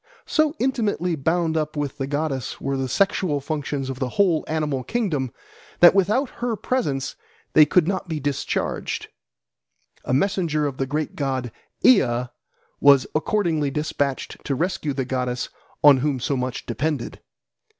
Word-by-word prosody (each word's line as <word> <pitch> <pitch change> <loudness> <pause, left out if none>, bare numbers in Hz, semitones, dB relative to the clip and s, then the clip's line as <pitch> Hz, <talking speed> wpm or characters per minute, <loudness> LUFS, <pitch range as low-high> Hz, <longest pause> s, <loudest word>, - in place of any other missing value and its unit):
So 310 0 +2
intimately 215 - 0
bound 160 +2 0
up 155 -1 -1
with 145 0 -3
the 135 - -2
goddess 145 -3 -2
were 135 0 -2
the 135 -1 -2
sexual 185 -2 +1
functions 145 -1 -3
of 130 -1 -5
the 130 -2 -1
whole 180 -6 +3
animal 150 -4 -1
kingdom 155 - -1 0.5
that 175 - +9
without 210 +8 +2
her 240 -2 0
presence 150 - -2 0.4
they 155 -1 +7
could 165 +1 +3
not 190 -1 -2
be 160 -2 -3
discharged. 145 -1 -2 0.9
A - - -4
messenger 155 0 +1
of 140 -3 -3
the 135 - -1
great 150 +3 -2
god 130 -4 -2 0.3
Ea 125 - +4 0.5
was 140 -2 +6
accordingly 160 -3 +1
despatched 145 -2 -2
to 140 - -1
rescue 170 -2 -1
the 135 -1 -2
goddess 125 -1 -2 0.3
on 145 -2 +8
whom 135 0 0
so 140 +3 -1
much 125 -1 -3
depended. 135 +3 -3
150 Hz, 150 wpm, -23 LUFS, 135-175 Hz, 0.9 s, that